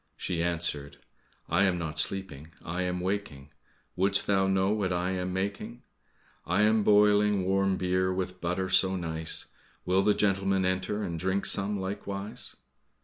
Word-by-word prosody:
She 85 -2 -2
answered, 80 -4 -2 0.5
"I 85 +4 +2
am 95 -2 +1
not 80 -2 -3
sleeping, 85 -5 -3 0.2
I 90 +3 -3
am 90 0 -2
waking, 90 -7 -4 0.4
Wouldst 100 +2 +2
thou 95 -1 +2
know 95 +1 +2
what 100 -3 0
I 90 +1 0
am 90 -1 -2
making? 100 +5 -4 0.6
I 95 +5 +1
am 110 +1 +4
boiling 105 -1 +4
warm 95 0 +2
beer 95 0 +1
with 90 0 -4
butter 90 +2 -1
so 95 0 +3
nice, 80 -3 -3 0.4
Will 95 +1 +3
the 105 +1 +3
gentleman 95 -2 +1
enter 95 +3 -1
and 85 -4 -4
drink 95 +2 0
some 100 +1 0
likewise?" 100 +1 -4
95 Hz, 150 wpm, -28 LUFS, 90-100 Hz, 0.6 s, am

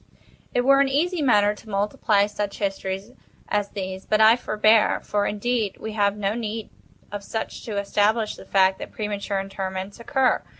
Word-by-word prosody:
It 245 - +1
were 275 +2 +5
an 275 - +2
easy 330 +5 0
matter 210 -6 +4
to 215 +1 -15
multiply 205 0 +1
such 205 -1 -4
histories 195 +1 -3 0.4
as 205 -1 0
these—but 190 +1 -2
I 220 +1 +7
forbear—for, 215 -2 +2
indeed, 215 -1 -1
we 220 - -5
have 205 -1 +1
no 200 0 0
need 225 -1 -5 0.4
of 205 -1 -5
such 220 +2 -5
to 215 -3 -4
establish 210 +2 +1
the - - -12
fact 190 -1 +3
that - - -7
premature 205 -2 -3
interments 195 +1 -5
occur. 260 +2 +1
210 Hz, 160 wpm, -24 LUFS, 200-225 Hz, 0.4 s, I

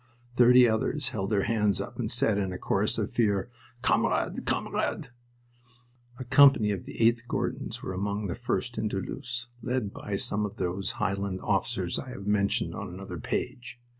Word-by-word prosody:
Thirty 125 0 +7
others 130 +5 0
held 100 -6 -3
their 100 -3 +2
hands 105 -3 +2
up - - -6
and - - -1
said, 105 -2 +2
in 95 -2 -1
a 90 - -4
chorus - - 0
of - - -2
fear, 105 -1 +1 0.3
"Kamerad! - - +1
Kamerad!" - - -1 1.1
A 130 - -5
company 130 -4 +6
of 95 -3 -4
the - - -9
8th 115 +1 +3
Gordons - - -3
were 95 - -4
among 100 +2 -2
the 90 - -2
first 120 -1 -2
into 105 -3 -1
Loos, 125 +4 -5 0.2
led 120 -4 -2
by 100 - -4
some 105 +1 0
of 105 - -4
those 95 +2 -2
Highland 100 -1 -2
officers - - -1
I - - -7
have 100 - -8
mentioned 105 +2 +1
on 105 -3 -5
another 90 -1 -7
page. 125 - -4
105 Hz, 170 wpm, -28 LUFS, 100-120 Hz, 1.1 s, Thirty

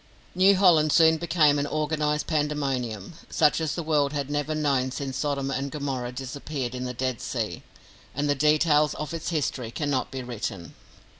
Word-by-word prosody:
New 190 +2 +5
Holland 170 -5 +5
soon 160 0 +5
became 155 -3 +3
an 145 - -1
organised 150 0 -1
pandemonium, 140 - -2 0.2
such 155 +1 +3
as 155 -2 -1
the 170 - -3
world 150 -2 +1
had 140 -1 -3
never 145 +1 -1
known 140 -4 +1
since 130 0 -5
Sodom 140 -1 -1
and 135 +1 -2
Gomorrah 135 -4 -3
disappeared 135 0 -5
in 125 0 -4
the 125 - -4
Dead 130 -1 -2
Sea, - - -3 0.5
and 145 +2 0
the 145 - +3
details 150 +1 +3
of 150 +2 -5
its 165 -1 -4
history 140 -7 -2
cannot 140 +1 -2
be 130 -1 -5
written. 105 -8 -5
145 Hz, 170 wpm, -26 LUFS, 130-155 Hz, 0.5 s, New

